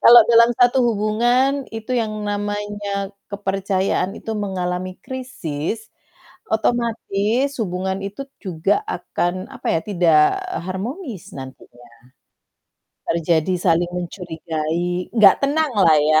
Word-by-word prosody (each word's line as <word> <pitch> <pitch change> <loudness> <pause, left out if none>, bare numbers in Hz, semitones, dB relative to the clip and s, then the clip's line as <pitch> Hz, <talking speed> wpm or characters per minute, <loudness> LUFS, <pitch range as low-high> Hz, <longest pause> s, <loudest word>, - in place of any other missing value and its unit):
kalau 240 0 +10
dalam 235 0 +7
satu 245 +1 +5
hubungan, 240 +5 +2
itu 225 +3 -4
yang 230 -3 0 0.2
namanya 205 -1 -3 0.2
kepercayaan 195 -1 -1
itu - - -7
mengalami 185 -2 -3
krisis, 220 - -4 0.6
otomatis 230 +2 0
hubungan 190 0 -2
itu 205 +8 -6 0.2
juga 185 - 0
akan, 185 - -2
apa 265 - -9
ya, - - -5
tidak 170 -6 +4 0.5
harmonis 225 - -5
nantinya. 130 -2 -11 1.2
Terjadi 165 +1 +1
saling 175 0 +2
mencurigai, 175 0 -3
nggak 210 -4 +7
tenang 295 +1 +1
lah 185 -5 +6
ya. 155 +1 +4
200 Hz, 105 wpm, -21 LUFS, 180-230 Hz, 1.2 s, kalau